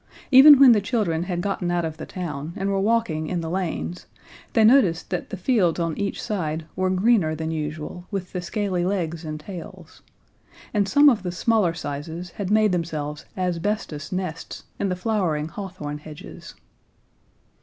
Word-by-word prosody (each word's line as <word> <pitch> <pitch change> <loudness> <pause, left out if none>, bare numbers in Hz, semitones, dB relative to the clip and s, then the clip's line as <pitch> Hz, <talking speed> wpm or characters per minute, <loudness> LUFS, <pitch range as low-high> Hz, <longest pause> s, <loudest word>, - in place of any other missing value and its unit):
Even 275 +2 +10
when 270 -3 +9
the 215 -3 +4
children 200 -7 -1
had 175 -2 -2
gotten 195 -2 -2
out 175 -1 0
of 160 -1 -5
the - - -7
town 155 -3 -5
and 195 +1 -1
were 195 - +1
walking 195 -7 0
in 175 0 -2
the 160 0 -4
lanes, 180 -1 -3 0.5
they 225 - +4
noticed 215 -9 +4
that 180 - -3
the 195 - -5
fields 185 -4 +2
on 165 -2 -1
each 200 -1 -3
side 160 -7 -3
were 185 0 0
greener 185 -4 +2
than 160 +1 -3
usual 155 +3 -5
with 195 -3 -4
the 180 - -2
scaly 185 0 -2
legs 175 -3 -2
and 155 -1 -5
tails; 175 +2 -10 0.7
and 200 -2 +1
some 290 +7 +6
of 240 -8 +5
the 180 -1 -3
smaller 185 -1 +1
sizes 160 +3 -6
had 195 0 -5
made 215 -1 +4
themselves 155 -4 -3
asbestos 180 -4 -2
nests 185 -3 -5 0.2
in 200 - 0
the 180 - -1
flowering 180 -6 -1
hawthorn 165 -6 -6
hedges. 155 +5 -11
180 Hz, 170 wpm, -24 LUFS, 160-200 Hz, 0.7 s, Even